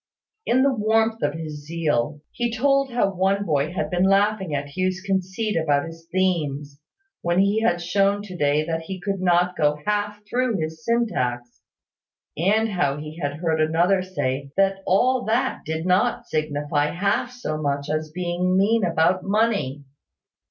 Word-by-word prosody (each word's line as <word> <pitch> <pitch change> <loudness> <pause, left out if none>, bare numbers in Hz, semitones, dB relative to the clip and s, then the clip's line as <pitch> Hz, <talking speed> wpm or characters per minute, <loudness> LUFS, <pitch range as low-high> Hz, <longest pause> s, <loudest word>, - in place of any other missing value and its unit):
In 255 +2 +4
the 275 -1 +3
warmth 225 0 +1
of 145 +1 0
his 155 -2 -6
zeal, 150 -4 -1
he 240 -1 -2
told 275 +2 +2
how 220 -5 +1
one 195 +2 +1
boy 150 -1 0
had 185 +2 -3
been 180 +1 +2
laughing 195 -4 +2
at 140 0 -5
Hugh's 185 0 0
conceit 195 +3 -2
about 145 -3 +1
his 165 0 -11
themes, 150 -6 -1 0.4
when 175 0 0
he 200 +3 +3
had 175 -6 +2
shown 195 +3 +1
to 190 -3 -9
day 150 -1 +1
that 165 0 -2
he 185 +3 -6
could 195 +1 -3
not 180 0 +2
go 150 0 +2
half 210 0 -1
through 245 -1 0
his 160 -1 -5
syntax; 125 - -1 0.7
and 210 +7 +2
how 145 -8 0
he 155 +2 -8
had 145 -1 -1
heard 160 -2 +1
another 170 +5 +2
say 140 -7 -3
that 195 0 +2
all 250 +7 +3
that 220 +1 0
did 160 +1 -3
not 180 0 +2
signify 145 -1 0
half 200 +8 0
so 200 -11 -4
much 140 0 -1
as 155 +1 -1
his 155 - -17
being 180 +2 0
mean 215 +3 +3
about 175 +1 +2
money. 195 - 0
180 Hz, 165 wpm, -23 LUFS, 155-205 Hz, 0.7 s, In